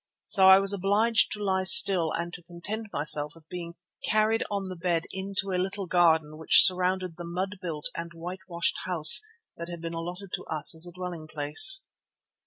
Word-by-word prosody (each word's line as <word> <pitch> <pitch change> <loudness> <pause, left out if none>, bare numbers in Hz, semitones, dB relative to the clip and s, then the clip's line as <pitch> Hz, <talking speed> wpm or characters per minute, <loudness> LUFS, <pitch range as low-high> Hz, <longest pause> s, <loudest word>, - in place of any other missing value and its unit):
So 190 -3 +3
I 190 - +7
was 195 0 0
obliged 205 +4 0
to 210 -1 -8
lie 190 -1 -1
still 185 -3 +5
and 170 +1 -6
to 180 - -10
content 190 +6 -8
myself 150 0 +1
with 160 -1 -20
being 170 -1 -9 0.3
carried 215 +1 0
on 200 -2 -5
the 185 - -8
bed 170 -1 -3
into 195 0 -6
a 180 -1 -2
little 195 +1 -5
garden 160 -3 0
which 160 - +6
surrounded 185 -1 -1
the 175 - -9
mud 185 +3 -6
built 160 -5 -7
and 170 0 -8
white 175 +3 -10
washed 170 -2 -3
house 165 -4 +5 0.4
that 170 +1 -9
had 170 -1 -9
been 165 0 -8
allotted 175 +3 -9
to - - -5
us 155 -2 +1
as 160 +2 +1
a - - -11
dwelling 175 -3 -9
place. 155 - +4
180 Hz, 195 wpm, -25 LUFS, 165-195 Hz, 0.4 s, I